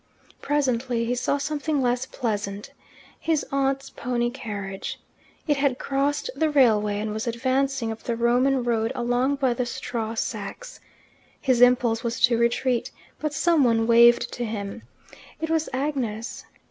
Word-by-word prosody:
Presently 255 Hz, -4 st, 0 dB
he 240 Hz, -, 0 dB
saw 250 Hz, +3 st, 0 dB
something 295 Hz, +1 st, -1 dB
less 250 Hz, 0 st, 0 dB
pleasant 210 Hz, -1 st, -3 dB, 0.5 s
his 320 Hz, -2 st, 0 dB
aunt's 275 Hz, 0 st, 0 dB
pony 240 Hz, -1 st, -1 dB
carriage. 205 Hz, -7 st, -6 dB, 0.5 s
It 295 Hz, -3 st, +1 dB
had 275 Hz, -2 st, +1 dB
crossed 280 Hz, +2 st, -1 dB
the 315 Hz, -1 st, +1 dB
railway, 215 Hz, -8 st, +3 dB
and 210 Hz, 0 st, -3 dB
was 220 Hz, +2 st, -4 dB
advancing 260 Hz, 0 st, 0 dB
up 225 Hz, -, -7 dB
the 235 Hz, -, -2 dB
Roman 245 Hz, +3 st, +2 dB
road 230 Hz, -1 st, 0 dB
along 245 Hz, +3 st, +1 dB
by 265 Hz, -3 st, +1 dB
the 245 Hz, +1 st, -2 dB
straw 230 Hz, -2 st, -4 dB
sacks. -, -, -5 dB, 0.6 s
His 255 Hz, -3 st, +2 dB
impulse 245 Hz, -2 st, +4 dB
was 235 Hz, 0 st, -2 dB
to 240 Hz, -2 st, +4 dB
retreat, 235 Hz, +1 st, +1 dB, 0.3 s
but 305 Hz, -1 st, -2 dB
someone 285 Hz, -8 st, +3 dB
waved 235 Hz, +1 st, +5 dB
to 245 Hz, -, -3 dB
him. 215 Hz, -1 st, -5 dB, 0.6 s
It 320 Hz, 0 st, -3 dB
was 320 Hz, -1 st, +1 dB
Agnes. 260 Hz, -5 st, -3 dB
245 Hz, 145 wpm, -25 LUFS, 230-275 Hz, 0.6 s, waved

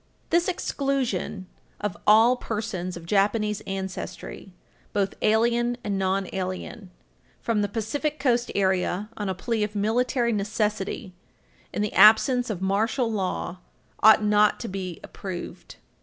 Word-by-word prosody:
This 340 Hz, +1 st, +3 dB
exclusion 260 Hz, -, -2 dB, 0.3 s
of 205 Hz, -4 st, -3 dB
"all 225 Hz, +4 st, +7 dB
persons 210 Hz, -7 st, -4 dB
of 170 Hz, -, -10 dB
Japanese 210 Hz, +2 st, +1 dB
ancestry, 190 Hz, 0 st, -6 dB, 0.4 s
both 200 Hz, -1 st, 0 dB
alien 235 Hz, +2 st, +2 dB
and 200 Hz, -2 st, -1 dB
non 190 Hz, 0 st, 0 dB
alien," 190 Hz, +2 st, -5 dB, 0.5 s
from 225 Hz, -3 st, 0 dB
the 205 Hz, -, +1 dB
Pacific 260 Hz, +9 st, -2 dB
Coast 245 Hz, -3 st, +1 dB
area 190 Hz, +1 st, 0 dB
on 205 Hz, -3 st, -3 dB
a 190 Hz, -, -2 dB
plea 220 Hz, +4 st, -1 dB
of 210 Hz, 0 st, -4 dB
military 235 Hz, +3 st, +1 dB
necessity 210 Hz, -1 st, -2 dB, 0.6 s
in 205 Hz, -, -1 dB
the 210 Hz, -, -2 dB
absence 245 Hz, +3 st, +6 dB
of 190 Hz, -4 st, -3 dB
martial 220 Hz, +5 st, +1 dB
law 185 Hz, -3 st, -3 dB, 0.4 s
ought 215 Hz, 0 st, +7 dB
not 210 Hz, 0 st, +3 dB
to 235 Hz, -, -4 dB
be 185 Hz, -3 st, -5 dB
approved. 185 Hz, -3 st, -8 dB
210 Hz, 130 wpm, -25 LUFS, 195-235 Hz, 0.6 s, all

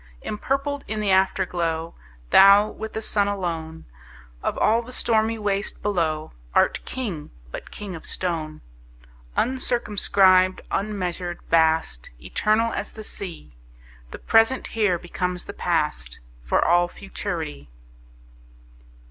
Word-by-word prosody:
Empurpled 275 Hz, +6 st, -2 dB
in 215 Hz, 0 st, -3 dB
the 205 Hz, -2 st, +1 dB
Afterglow, 175 Hz, -3 st, +1 dB, 0.4 s
Thou, 200 Hz, +2 st, +8 dB
with 220 Hz, 0 st, -7 dB
the 220 Hz, -, -4 dB
Sun 205 Hz, -1 st, +2 dB
alone, 165 Hz, -5 st, -4 dB, 0.6 s
Of -, -, -2 dB
all 225 Hz, +2 st, +3 dB
the 240 Hz, +2 st, -11 dB
stormy 225 Hz, -2 st, +1 dB
waste 205 Hz, -1 st, -2 dB
below, 160 Hz, -6 st, -1 dB, 0.2 s
Art -, -, +3 dB
King, 200 Hz, -13 st, -4 dB, 0.2 s
but -, -, -7 dB
king 205 Hz, -3 st, -7 dB
of 165 Hz, -, -8 dB
stone! 160 Hz, -4 st, -3 dB, 0.8 s
Uncircumscribed, 200 Hz, -7 st, +3 dB
unmeasured, 180 Hz, -4 st, -2 dB
vast, 160 Hz, -, +2 dB
Eternal 215 Hz, -, +1 dB
as -, -, -4 dB
the 220 Hz, -, -8 dB
Sea, 175 Hz, -, -6 dB, 0.5 s
The -, -, -8 dB
present 225 Hz, +4 st, +3 dB
here 210 Hz, -6 st, +1 dB
becomes 180 Hz, +1 st, -3 dB
the 200 Hz, -, -7 dB
past, 150 Hz, -, -1 dB, 0.2 s
For -, -, +1 dB
all 175 Hz, +1 st, +4 dB
futurity. 170 Hz, -, -6 dB
190 Hz, 115 wpm, -24 LUFS, 165-215 Hz, 0.8 s, Thou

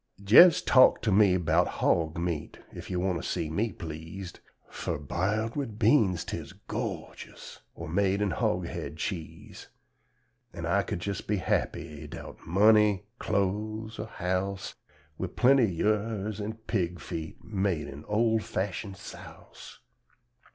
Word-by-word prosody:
Jes' 115 Hz, -, +7 dB
talk 130 Hz, -, +5 dB
to 105 Hz, -, +1 dB
me 95 Hz, -2 st, +5 dB
'bout 90 Hz, -, +2 dB
hog 80 Hz, -1 st, 0 dB
meat, 85 Hz, -3 st, -3 dB, 0.2 s
ef -, -, -8 dB
yo' 90 Hz, -, -2 dB
want 90 Hz, -2 st, 0 dB
to -, -, -4 dB
see 80 Hz, -3 st, -2 dB
me 105 Hz, +7 st, 0 dB
pleased, 85 Hz, +2 st, -8 dB, 0.3 s
Fur -, -, -4 dB
biled 105 Hz, +10 st, -1 dB
wid 130 Hz, -8 st, -4 dB
beans 105 Hz, -, +3 dB
tiz -, -, -6 dB
gor'jus, -, -, -6 dB, 0.2 s
or -, -, -7 dB
made 95 Hz, +4 st, +1 dB
in 105 Hz, -2 st, 0 dB
hog -, -, 0 dB
head 80 Hz, -, -6 dB
cheese; 85 Hz, -2 st, -6 dB, 0.9 s
An' -, -, -5 dB
I -, -, +2 dB
could 85 Hz, -, -4 dB
jes' 100 Hz, -2 st, -2 dB
be 105 Hz, -, -1 dB
happy, 80 Hz, -3 st, -2 dB
'dout -, -, -9 dB
money, 105 Hz, +1 st, +4 dB, 0.2 s
cloze 110 Hz, +2 st, -2 dB
or 110 Hz, -, -4 dB
house, 95 Hz, 0 st, -3 dB, 0.5 s
Wid 95 Hz, -1 st, -4 dB
plenty 125 Hz, -4 st, +5 dB
yurz 105 Hz, +2 st, -1 dB
an' 105 Hz, +2 st, -3 dB
pig 90 Hz, -5 st, -1 dB
feet 80 Hz, -1 st, -7 dB
made 95 Hz, -6 st, -1 dB
in 70 Hz, +2 st, -9 dB
ol' 110 Hz, +1 st, +2 dB
fashun 100 Hz, 0 st, -4 dB
"souse." 95 Hz, -, -12 dB
100 Hz, 140 wpm, -28 LUFS, 85-110 Hz, 0.9 s, Jes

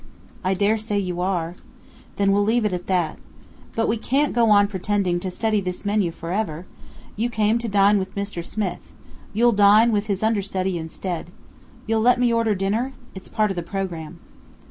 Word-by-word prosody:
"I 190 Hz, +1 st, +1 dB
dare 205 Hz, +3 st, +2 dB
say 210 Hz, -1 st, -2 dB
you 180 Hz, -3 st, -2 dB
are." 175 Hz, -3 st, -1 dB, 0.6 s
"Then 200 Hz, -1 st, +2 dB
we'll 200 Hz, +1 st, +3 dB
leave 220 Hz, +2 st, +2 dB
it 205 Hz, -, 0 dB
at 180 Hz, 0 st, -4 dB
that. 180 Hz, -4 st, 0 dB, 0.6 s
But 225 Hz, -, +1 dB
we 225 Hz, -, +1 dB
can't 275 Hz, +6 st, 0 dB
go 235 Hz, -2 st, +3 dB
on 205 Hz, -1 st, +6 dB
pretending 195 Hz, -2 st, -1 dB
to 185 Hz, -, -4 dB
study 215 Hz, +2 st, 0 dB
this 180 Hz, +1 st, -4 dB
menu 205 Hz, -3 st, +1 dB
for 165 Hz, 0 st, -7 dB
ever! 185 Hz, -5 st, -2 dB, 0.5 s
You 230 Hz, +3 st, -1 dB
came 220 Hz, 0 st, +1 dB
to 235 Hz, -, -4 dB
dine 200 Hz, 0 st, +4 dB
with 190 Hz, 0 st, -5 dB
Mr. 200 Hz, -4 st, -4 dB
Smith. 200 Hz, +1 st, -4 dB, 0.4 s
You'll 235 Hz, +3 st, +3 dB
dine 210 Hz, +2 st, +6 dB
with 210 Hz, 0 st, 0 dB
his 200 Hz, -1 st, -1 dB
understudy 190 Hz, -4 st, 0 dB
instead. 170 Hz, +2 st, -5 dB, 0.6 s
You'll 220 Hz, 0 st, +1 dB
let 245 Hz, +2 st, +4 dB
me 245 Hz, -1 st, +3 dB
order 230 Hz, -2 st, +2 dB
dinner? 215 Hz, +8 st, -1 dB, 0.2 s
It's 190 Hz, -, -9 dB
part 215 Hz, -2 st, 0 dB
of -, -, -4 dB
the 175 Hz, -, -2 dB
programme." 170 Hz, -2 st, -5 dB
200 Hz, 190 wpm, -23 LUFS, 185-220 Hz, 0.6 s, on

